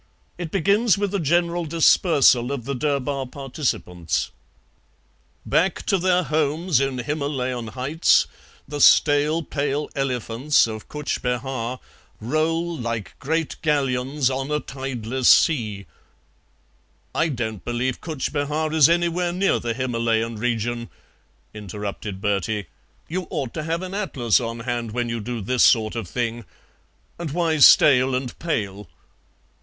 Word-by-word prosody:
It 175 -2 -4
begins 200 +5 +2
with 200 -1 -2
a 200 - 0
general 170 +2 +1
dispersal 150 -5 +4
of 130 -5 -4
the 140 - -2
Durbar 140 0 -1
participants: 125 - -3 1.1
'Back 180 +2 +1
to 195 -3 +2
their 180 0 +2
homes 155 +1 +1
in 135 -1 -1
Himalayan 130 -3 -3
heights 130 +8 +2 0.4
The 145 -1 -4
stale 150 +4 +5
pale 145 0 -2
elephants 130 +1 +1
of 110 -1 -7
Cutch 150 -1 -3
Behar 125 -1 -3 0.4
Roll 165 +7 -1
like 115 -5 -4
great 160 +2 -2
galleons 135 -2 0
on 135 +1 -3
a 150 0 0
tideless 130 -3 -2
sea 110 - +3 0.6
'" - - -40
"I 165 - +1
don't 110 -7 -4
believe 120 +1 -2
Cutch 155 -5 -4
Behar 150 +2 -1
is 155 -2 +6
anywhere 175 +1 +1
near 190 +3 +1
the 115 -1 -3
Himalayan 115 -2 -1
region," 120 +1 -2 0.6
interrupted 105 -1 -6
Bertie. 105 0 -1 0.4
"You 180 +2 -4
ought 130 -5 -3
to 155 - -3
have 165 +3 -2
an 185 0 -6
atlas 135 - +1
on 115 -1 -5
hand 120 -2 -3
when 120 0 -1
you 115 0 -2
do 115 +1 -5
this 125 +5 0
sort 110 -2 +4
of 115 -5 -4
thing; 120 +2 -3 0.8
and 170 -2 -4
why 165 +1 0
stale 130 -2 +6
and 125 -1 -4
pale?" 105 - -3
135 Hz, 135 wpm, -23 LUFS, 115-155 Hz, 1.1 s, is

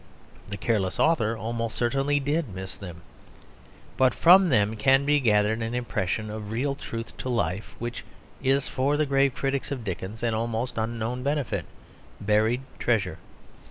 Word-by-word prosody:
The 100 - -4
careless 100 -5 0
author 115 -9 +2
almost 115 +1 -3
certainly 135 +4 +1
did 145 0 -1
miss 95 -1 -6
them. 85 -4 -10 0.9
But 130 -2 +4
from 185 +2 +7
them 105 -4 +2
can 135 +5 +4
be 145 0 +4
gathered 110 -2 +2
an 115 +2 -2
impression 110 -3 -2
of 105 -1 -6
real 130 +6 -1
truth 115 -4 -7
to 130 - -4
life 110 -4 -2
which 120 +1 -5 0.4
is 135 +1 +2
for 140 +3 0
the 155 - +2
grave 135 -1 +2
critics 135 0 -2
of 130 -4 -3
Dickens 100 +3 -5
an 115 -1 +1
almost 115 +2 -2
unknown 115 +2 -2
benefit, 130 - -1 0.5
buried 110 +4 +2 0.2
treasure. 100 -9 0
115 Hz, 155 wpm, -26 LUFS, 110-135 Hz, 0.9 s, from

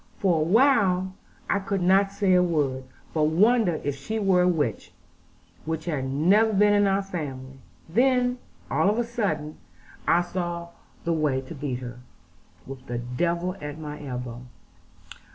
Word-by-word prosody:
For 180 -5 +2
a - - +2
while 190 - +3 0.3
I 200 - +1
could 195 -1 -2
not 195 +2 +4
say 200 -2 +1
a 180 - +5
word, 145 -7 0 0.3
but 155 -2 +2
wondered 190 +2 +3
if 145 - 0
she 180 +11 -4
were 195 -4 +3
a 180 - +3
witch, 150 - -1 0.7
which 160 0 -4
had 150 -6 -2
never 180 +12 +3
been 205 +1 +4
in 205 -1 +4
our 195 0 +1
family: 135 -8 -6 0.3
and 165 - -16
then, 250 0 +3 0.3
all 195 - +3
of 210 - 0
a 240 - +2
sudden, 205 - -3 0.5
I 175 +1 +4
saw 175 -1 -4 0.3
the 170 - 0
way 150 -4 +1
to 135 +5 -10
beat 135 -4 -4
her, 120 -1 -8 0.7
with 135 -1 -10
the 120 - -3
devil 170 +9 -1
at 150 0 -6
my 150 -1 -7
elbow. 125 -3 -6
170 Hz, 165 wpm, -25 LUFS, 145-195 Hz, 0.7 s, a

